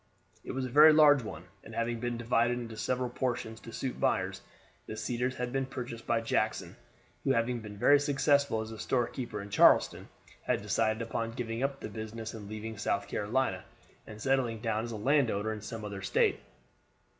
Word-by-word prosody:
It - - -6
was 130 0 -2
a - - -4
very 150 +5 +8
large 150 -3 +6
one, 100 -8 -7 0.2
and 110 - -10
having 115 0 -1
been 120 0 -2
divided 120 +1 +1
into 115 -2 -6
several 125 +3 -1
portions 120 -3 -3
to 115 - -11
suit 130 +2 -4
buyers, - - 0 0.5
the 110 - -6
Cedars 125 +3 -2
had 125 -1 -3
been 135 -1 0
purchased 120 -3 -7
by 115 -1 +2
Jackson, 115 - -1 0.5
who, - - +2
having 120 +1 0
been 105 -2 -9
very 145 +7 +6
successful 140 -4 +2
as 110 0 -6
a 110 - -8
storekeeper 120 -3 -2
at 100 0 -9
Charleston, - - +4 0.3
had - - -1
decided 110 0 +1
upon 115 0 -3
giving 115 -1 -4
up 135 0 -1
the - - -4
business 110 +1 -6
and 105 -3 -8
leaving 110 0 -6
South 100 0 -1
Carolina, 105 -3 -1 0.4
and 105 0 -10
settling 125 -2 +1
down 110 0 -1
as 120 - -6
a - - -4
land 135 +3 +3
owner 105 +2 -1
in 105 - -7
some 110 0 -6
other 100 -2 -6
State. 95 - +2
115 Hz, 190 wpm, -31 LUFS, 110-125 Hz, 0.5 s, very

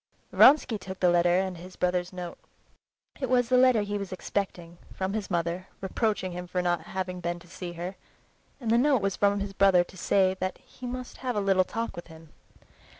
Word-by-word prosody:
Vronsky 260 -6 +6
took 190 -1 -8
the 180 -1 +4
letter 175 +1 +4
and 185 -3 -4
his 185 +1 -11
brother's 180 0 0
note. 180 -2 -7 0.8
It 265 -3 -2
was 245 -2 +3
the 255 - +4
letter 250 -4 +5
he 205 0 -3
was 200 -2 -6
expecting—from 185 0 -4
his 210 -3 -3
mother, 175 +1 -2
reproaching 195 -1 -1
him 180 0 -6
for 180 +1 -2
not 175 -1 +1
having 185 -1 -4
been 175 0 -2
to 175 0 -16
see 180 0 -7
her—and 185 - -8
the 235 - +5
note 270 -4 +3
was 195 -1 0
from 200 0 +2
his 200 0 -4
brother 195 -2 +5
to 185 - -15
say 190 +1 +2
that 185 0 -2
he 250 - -11
must 255 0 -6
have 250 -2 -3
a - - +1
little 195 -2 +3
talk 230 +5 -4
with 175 - -8
him. 160 -1 -14
190 Hz, 200 wpm, -28 LUFS, 180-210 Hz, 0.8 s, Vronsky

